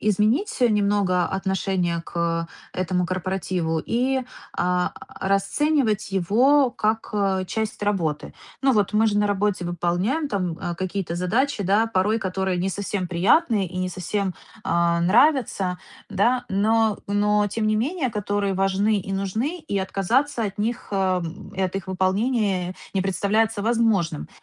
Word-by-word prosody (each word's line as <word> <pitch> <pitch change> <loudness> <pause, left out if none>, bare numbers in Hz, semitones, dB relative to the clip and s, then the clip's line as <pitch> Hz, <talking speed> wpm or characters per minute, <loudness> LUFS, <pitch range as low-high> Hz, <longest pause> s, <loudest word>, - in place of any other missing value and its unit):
изменить 215 - +1
немного 205 -5 +2
отношение 190 -2 -1
к 165 0 -2 0.3
этому 180 0 0
корпоративу 180 -2 -2
и, 260 +3 +1 0.4
а, 180 0 +1 0.3
расценивать 215 +2 +1
его 245 +9 +4
как, 220 -1 -1
а, 195 -2 +1
часть 220 +2 -3
работы? 170 -8 -1 0.3
Ну, 270 - +4
вот, 210 -4 +1
мы 220 +1 +4
же 205 -1 +1
на 210 - +3
работе 205 -2 0
выполняем, 175 - 0
э, - - -8
там 185 -8 -1 0.2
какие-то 185 -1 -3
задачи, 215 +6 0
да, 205 +5 +3
порой 215 +1 +1
которые 190 -1 -1
не 185 +2 0
совсем 195 -1 -3
приятные 200 - +3
и 180 - -9
не 185 0 -1
совсем, 185 +2 -2 0.3
а, 170 0 +2
нравятся. 200 - +3 0.3
Да, 235 +5 +1
но 215 +2 +2
но 205 +1 +2
тем 215 +2 -2
не 215 - +2
менее, 275 +5 0
которые 205 -2 -1
важны 195 +2 +1
и 195 +1 -6
нужны, 220 - -2
и 310 - -3
отказаться 225 +7 0
от 200 -1 -5
них, 225 +3 -2
э, 190 -2 +1 0.4
и - - -2
от 185 0 -1
их 190 -1 -6
выполнения 190 -1 0 0.2
не 190 - +1
представляется 205 +3 +1
возможным. 220 - +1
200 Hz, 140 wpm, -23 LUFS, 185-220 Hz, 0.4 s, его